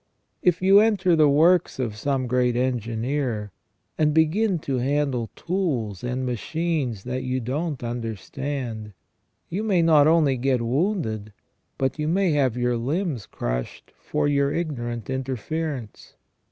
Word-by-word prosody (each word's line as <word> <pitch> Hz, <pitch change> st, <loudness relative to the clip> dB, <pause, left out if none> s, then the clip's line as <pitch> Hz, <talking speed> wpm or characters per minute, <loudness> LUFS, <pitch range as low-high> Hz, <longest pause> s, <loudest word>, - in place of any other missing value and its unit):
If 180 Hz, -1 st, +2 dB
you 195 Hz, +2 st, +7 dB
enter 205 Hz, -5 st, +3 dB
the 155 Hz, -2 st, +5 dB
works 165 Hz, +5 st, +4 dB
of 120 Hz, -5 st, -2 dB
some 130 Hz, +4 st, -1 dB
great 125 Hz, 0 st, +1 dB
engineer, 120 Hz, -2 st, -1 dB, 0.5 s
and 150 Hz, -1 st, +3 dB
begin 180 Hz, +5 st, +3 dB
to 135 Hz, -2 st, 0 dB
handle 135 Hz, -3 st, 0 dB
tools 140 Hz, -, -2 dB
and 125 Hz, +1 st, -2 dB
machines 130 Hz, -, -2 dB
that 125 Hz, +1 st, -3 dB
you 130 Hz, 0 st, -1 dB
don't 140 Hz, +3 st, -3 dB
understand, 115 Hz, 0 st, -4 dB, 0.5 s
you 190 Hz, +5 st, -3 dB
may 195 Hz, -6 st, +2 dB
not 155 Hz, -3 st, +6 dB
only 155 Hz, -5 st, +4 dB
get 130 Hz, 0 st, +1 dB
wounded, 115 Hz, -, -1 dB, 0.4 s
but 135 Hz, +2 st, -1 dB
may 170 Hz, +4 st, +1 dB
have 135 Hz, -5 st, +1 dB
your 125 Hz, -1 st, +1 dB
limbs 145 Hz, -, -2 dB
crushed -, -, -4 dB
for 150 Hz, -1 st, -1 dB
your 140 Hz, -1 st, +2 dB
ignorant 120 Hz, -9 st, -3 dB
interference. 130 Hz, 0 st, -4 dB
135 Hz, 130 wpm, -24 LUFS, 120-160 Hz, 0.5 s, you